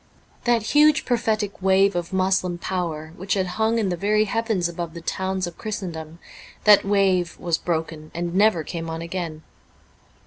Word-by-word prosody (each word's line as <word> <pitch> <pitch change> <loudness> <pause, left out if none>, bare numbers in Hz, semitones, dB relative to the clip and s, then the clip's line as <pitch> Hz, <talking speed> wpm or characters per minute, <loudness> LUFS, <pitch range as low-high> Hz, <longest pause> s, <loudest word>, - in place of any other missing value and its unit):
That 240 -2 +3
huge 300 0 +5
prophetic 215 -5 -1
wave 195 +1 +4
of 175 -1 -3
Moslem 185 -1 +1
power 165 -4 -4
which 190 +3 -1
had 190 -2 +1
hung 220 +5 0
in 210 -4 +1
the 180 - -1
very 210 +4 +2
heavens 220 -4 0
above 170 -1 -6
the 170 - -7
towns 190 +2 -2
of 175 -1 -9
Christendom: 170 -7 -5 0.5
that 210 -1 +7
wave 195 -3 +1
was 170 -2 0
broken, 160 -2 -3
and 170 0 -3
never 200 -4 +3
came 165 +1 -5
on 165 0 -4
again. 170 -3 -5
185 Hz, 165 wpm, -23 LUFS, 170-205 Hz, 0.5 s, that